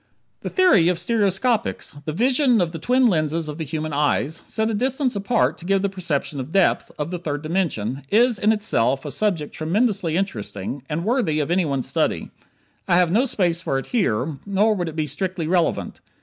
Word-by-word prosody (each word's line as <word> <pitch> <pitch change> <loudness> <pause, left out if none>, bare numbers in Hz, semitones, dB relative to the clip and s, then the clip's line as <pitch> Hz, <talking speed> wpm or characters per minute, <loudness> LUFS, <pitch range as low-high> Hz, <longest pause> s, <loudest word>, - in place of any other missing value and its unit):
The - - -5
theory 360 - +4
of 180 -1 +2
stereoscopics 200 - 0
the 155 - -2
vision 250 - +3
of 175 -3 0
the 165 - -6
twin 250 - +2
lenses 160 -5 +1
of 150 +1 -6
the - - -2
human 155 0 -4
eyes, 150 +1 0
set 220 0 -1
a - - -2
distance 255 +3 0
apart 160 -8 +1
to - - -9
give 195 +1 +1
the 200 - +1
perception 170 -6 -3
of 130 +4 -6
depth, 195 -1 +2
of 150 +2 -3
the 180 - -3
third 150 -3 -4
dimension 150 - -1
is 235 0 +3
in 210 - +3
itself 140 - 0
a 145 - -4
subject 175 -8 -1
tremendously 185 0 0
interesting, 120 - -3
and 165 +3 -2
worthy 220 - +1
of 150 +2 -1
anyone's 150 -8 0
study. - - -1 0.6
I - - +3
have 180 -2 +3
no 230 +8 +3
space 175 -8 0
for 135 - -1
it 135 - -4
here, 150 - 0
nor 205 +2 +2
would 175 -5 -2
it 160 - -10
be 155 -1 -1
strictly 185 +3 -3
relevant. 175 +1 0
175 Hz, 195 wpm, -22 LUFS, 150-210 Hz, 0.6 s, theory